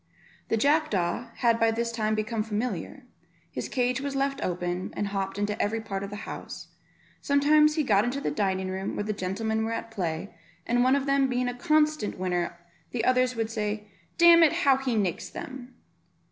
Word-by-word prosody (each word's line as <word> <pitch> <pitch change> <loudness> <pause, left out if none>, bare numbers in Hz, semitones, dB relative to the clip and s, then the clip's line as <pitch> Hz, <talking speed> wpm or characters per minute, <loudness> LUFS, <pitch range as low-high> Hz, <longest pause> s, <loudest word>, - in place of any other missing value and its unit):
The 225 - +1
jackdaw 245 - +1
had 230 -1 +2
by 225 - +4
this 230 +1 -1
time 215 -2 0
become 215 +1 -1
familiar; 215 - -3 0.5
his - - -5
cage 250 0 0
was 280 -1 -3
left 275 0 -1
open, 180 0 -2
and 205 - 0
he - - -9
hopped 195 0 -2
into 205 +1 -1
every 220 +2 0
part 195 -3 -4
of 200 - -5
the 205 - -7
house; - - -8 0.5
sometimes 300 +2 +4
he 310 - +1
got 205 -6 +3
into 245 +4 -1
the - - -2
dining 190 -2 -1
room, 190 +1 -3
where - - -2
the 215 +1 -2
gentlemen 220 +4 -2
were 225 +1 -2
at 230 0 -5
play, 175 -2 -3 0.3
and 245 +1 +2
one 260 +2 +4
of 280 -1 0
them 275 -1 +3
being 250 -1 0
a 245 - -1
constant 305 -1 +1
winner, 180 -2 -2 0.3
the 230 -2 -2
others 255 0 +3
would 225 -1 -2
say, 210 -1 -3 0.3
"Damn 340 -1 +8
it, 320 -3 +6
how 270 -2 +6
he 265 -3 -1
nicks 195 -6 -1
them." 255 -1 -8
225 Hz, 195 wpm, -27 LUFS, 205-270 Hz, 0.5 s, Damn